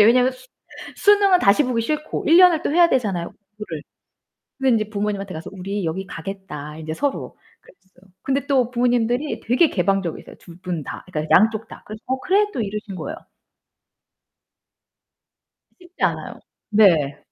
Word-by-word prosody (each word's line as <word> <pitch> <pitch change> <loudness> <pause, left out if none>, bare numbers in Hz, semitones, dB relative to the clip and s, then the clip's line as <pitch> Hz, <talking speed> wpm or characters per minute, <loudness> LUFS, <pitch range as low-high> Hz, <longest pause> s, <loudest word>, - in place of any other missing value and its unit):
이제 210 - +8
왜냐면 250 +3 +4 0.6
수능은 405 -2 +5
다시 200 +9 +4
보기 235 -2 -1
싫고 305 +4 -3
1 325 - +6
년을 355 -3 +6
또 - - -1
해야 340 +1 +5
되잖아요 200 - -1 0.3
공부를. 165 -8 -6 0.8
근데 265 -3 +3
이제 215 - -14
부모님한테 200 -2 -3
가서 160 +4 -7
"우리 195 0 -4
여기 185 +4 -3
가겠다." 160 -5 -7
인제 155 0 -5
서로 280 - -3 0.2
그랬어요. 190 0 -24
근데 275 0 -1
또 255 -3 +2
부모님들이 245 +3 0
되게 255 +8 +3
개방적이세요. 190 -2 -2
2 170 0 -14
분 175 -4 -4
다. - - -8
그러니까 155 -2 -3
양쪽 220 +2 +1
다. - - -13
그래서 215 +1 -9
"어 260 +1 -1
그래." 400 +3 +3
또 245 - -2
이러신 210 -1 -5
거예요. 310 - -6 2.6
쉽지 355 0 -13
않아요. - - -1 0.3
네. 165 -9 +4
215 Hz, 335 characters per minute, -21 LUFS, 185-265 Hz, 2.6 s, 이제